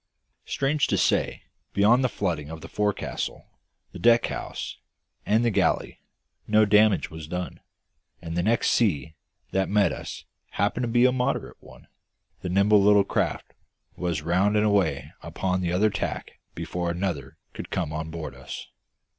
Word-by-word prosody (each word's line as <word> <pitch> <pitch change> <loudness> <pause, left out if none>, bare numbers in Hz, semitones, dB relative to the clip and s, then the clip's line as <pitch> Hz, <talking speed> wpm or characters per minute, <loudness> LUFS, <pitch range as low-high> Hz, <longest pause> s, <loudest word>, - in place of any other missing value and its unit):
Strange 140 +1 +1
to - - +1
say, - - +1 0.3
beyond 115 +6 +4
the 125 - +2
flooding 80 -9 -2
of 80 0 -8
the - - -8
forecastle, 105 -1 -2 0.5
the - - -9
deck 120 0 +5
house, - - -5 0.5
and 110 +3 +3
the 120 - +3
galley, - - 0 0.5
no 110 0 +5
damage 105 0 +4
was 80 -1 -8
done; 90 +2 -5 0.6
and, 85 -1 -6
the 85 - +1
next 115 +6 +2
sea 80 - +1 0.4
that 95 0 0
met 100 -5 +3
us - - -7 0.3
happening 120 +4 0
to - - -4
be 120 +1 +5
a 130 - +5
moderate 130 +2 -2
one, - - -16 0.5
the 90 - -4
nimble 100 +3 +4
little 100 0 +6
craft - - -2 0.4
was 85 -4 -2
round 95 +6 +2
and 105 - +3
away 100 -5 +1
upon 95 -1 -2
the 85 -1 -1
other 105 +4 +3
tack 100 - -4 0.2
before 90 -1 -3
another 85 -7 -3 0.2
could - - -7
come 80 -5 -2
on 80 +1 -4
board 80 -4 -6
us. 65 +1 -8
100 Hz, 160 wpm, -26 LUFS, 85-105 Hz, 0.6 s, little